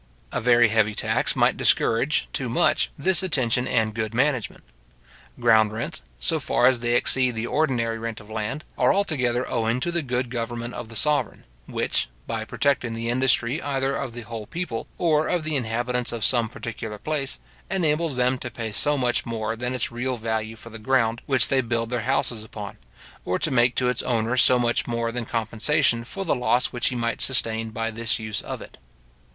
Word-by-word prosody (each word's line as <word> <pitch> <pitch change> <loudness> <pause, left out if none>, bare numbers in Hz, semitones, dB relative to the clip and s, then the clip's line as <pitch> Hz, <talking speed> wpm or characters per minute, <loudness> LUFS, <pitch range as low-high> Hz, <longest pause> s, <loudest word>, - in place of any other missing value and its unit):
A - - -2
very 120 -1 +5
heavy 110 -1 +2
tax - - +1
might - - +3
discourage, 135 +6 +3
too 130 -3 -2
much, 115 - +2
this 185 +6 +3
attention 130 -9 0
and 110 -2 +1
good 110 0 -3
management. 130 -3 0 0.8
Ground 110 -3 +4
rents, 110 +2 -3 0.2
so - - +1
far - - +2
as 130 -1 +5
they 120 0 0
exceed 125 0 +3
the 110 +1 -2
ordinary 120 -6 0
rent 115 -1 -5
of 105 - -14
land, 110 +7 -4 0.2
are - - +5
altogether 130 -11 0
owing 115 +1 0
to 175 - -1
the 170 0 -1
good 125 -3 -2
government 120 0 -4
of 115 - -7
the 115 - -10
sovereign, 150 +6 +1 0.2
which, - - -1 0.2
by 115 -1 -3
protecting 120 -1 0
the 115 +1 -3
industry 130 +2 +2
either 135 -1 -1
of 130 -4 -4
the 120 - -7
whole 110 -1 -7
people 170 -10 -4
or 155 -3 +2
of 175 -3 0
the 155 -1 -1
inhabitants 120 0 -1
of 115 -2 -2
some 120 -3 +2
particular 110 -2 -6
place, 140 - -2 0.3
enables 165 -5 0
them 125 +1 +1
to 120 - -5
pay 115 -2 -5
so 145 +7 +2
much 125 -2 +1
more 115 -1 -2
than 125 +2 -3
its 120 - -2
real 125 +2 -2
value 110 0 -3
for 115 +1 -12
the 115 - -9
ground 115 -1 +1
which 130 -4 +5
they 135 -1 +3
build 115 -1 -2
their 120 -2 -1
houses 120 -4 +1
upon; 105 -2 -8 0.4
or 90 - 0
to 160 - 0
make 125 -1 +3
to 125 - +1
its 125 -1 0
owner 115 0 0
so 125 0 +6
much 120 -1 +1
more 115 -1 -1
than 120 -1 -4
compensation 115 +2 +1
for 195 +11 -5
the 165 - +2
loss 125 0 +1
which 120 -1 0
he 125 - -5
might 115 -1 -2
sustain 115 -4 +1
by 115 +1 -3
this 115 +1 -1
use 110 -1 -3
of - - -6
it. - - -15
120 Hz, 195 wpm, -24 LUFS, 115-130 Hz, 0.8 s, so